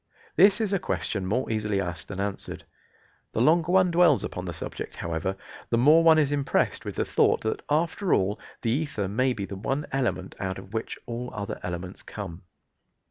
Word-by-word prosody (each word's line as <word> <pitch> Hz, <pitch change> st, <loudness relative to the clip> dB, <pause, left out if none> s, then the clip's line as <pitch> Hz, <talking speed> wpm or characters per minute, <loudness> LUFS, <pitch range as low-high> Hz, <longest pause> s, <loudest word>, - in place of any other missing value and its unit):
This 200 Hz, +2 st, +6 dB
is 215 Hz, -3 st, 0 dB
a 195 Hz, -, +2 dB
question 100 Hz, -, -1 dB
more 125 Hz, +7 st, 0 dB
easily 105 Hz, -2 st, 0 dB
asked 85 Hz, -5 st, -4 dB
than 95 Hz, -, -6 dB
answered. 100 Hz, 0 st, -4 dB, 0.7 s
The -, -, -1 dB
longer 160 Hz, +6 st, +4 dB
one 185 Hz, -1 st, +5 dB
dwells 170 Hz, -5 st, +5 dB
upon 90 Hz, -, -4 dB
the 90 Hz, -, -3 dB
subject, 80 Hz, -, -6 dB
however, 85 Hz, +3 st, -2 dB, 0.3 s
the 115 Hz, -, +2 dB
more 150 Hz, +7 st, +6 dB
one 160 Hz, -1 st, +7 dB
is 145 Hz, -2 st, +3 dB
impressed 140 Hz, -2 st, 0 dB
with -, -, -5 dB
the -, -, 0 dB
thought -, -, +3 dB
that 110 Hz, -, -2 dB
after 165 Hz, +5 st, +1 dB
all 100 Hz, +2 st, +2 dB, 0.2 s
the 115 Hz, -, +1 dB
ether 135 Hz, -7 st, -1 dB
may 125 Hz, +6 st, +1 dB
be 100 Hz, -4 st, -4 dB
the 100 Hz, -, -7 dB
one 135 Hz, +8 st, -2 dB
element 125 Hz, -8 st, -1 dB
out 95 Hz, -1 st, -2 dB
of 95 Hz, +1 st, -11 dB
which 110 Hz, -, -3 dB
all 120 Hz, +1 st, -4 dB
other 100 Hz, 0 st, -4 dB
elements 90 Hz, +1 st, -5 dB
come. 95 Hz, -4 st, -7 dB
115 Hz, 190 wpm, -27 LUFS, 95-155 Hz, 0.7 s, one